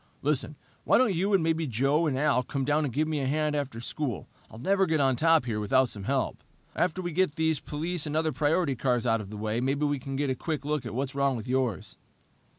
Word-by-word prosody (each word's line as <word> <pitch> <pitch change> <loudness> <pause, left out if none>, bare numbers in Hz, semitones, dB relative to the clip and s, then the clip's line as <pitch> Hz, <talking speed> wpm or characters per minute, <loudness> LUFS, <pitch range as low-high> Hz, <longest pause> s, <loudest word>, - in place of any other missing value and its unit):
Listen, - - -1 0.3
why - - +4
don't 250 -6 +3
you 190 +4 0
and 195 -4 +3
maybe 160 -1 0
Joe 135 +7 +1
and 135 -3 0
Al 140 -3 +2
come 135 +1 -3
down 150 +2 +2
and 135 - -3
give 155 +5 0
me 155 -2 -1
a 135 - -1
hand 150 +1 0
after 135 -5 -3
school? 120 -1 -4 0.2
I'll - - -12
never 195 - +2
get 160 -1 +1
on 135 -2 +3
top 160 0 +4
here 110 -3 -2
without 130 +5 +2
some 100 -3 -7
help. 135 +1 -1 0.3
After 180 +1 0
we 175 - -3
get 170 -2 +1
these 160 -2 +1
police 160 +2 -3
and 150 - -3
other 160 0 +1
priority 155 -1 +1
cars 125 -1 0
out 115 -2 +2
of 100 - -9
the 105 - -7
way, 110 +2 -1
maybe 140 +3 0
we 145 -1 0
can 135 +1 -6
get 140 0 0
a - - -1
quick 150 0 -4
look 150 -4 -1
at 110 - -6
what's 135 +1 -2
wrong 140 -1 +1
with 110 - -7
yours." 125 -5 -2
140 Hz, 250 wpm, -28 LUFS, 130-160 Hz, 0.3 s, why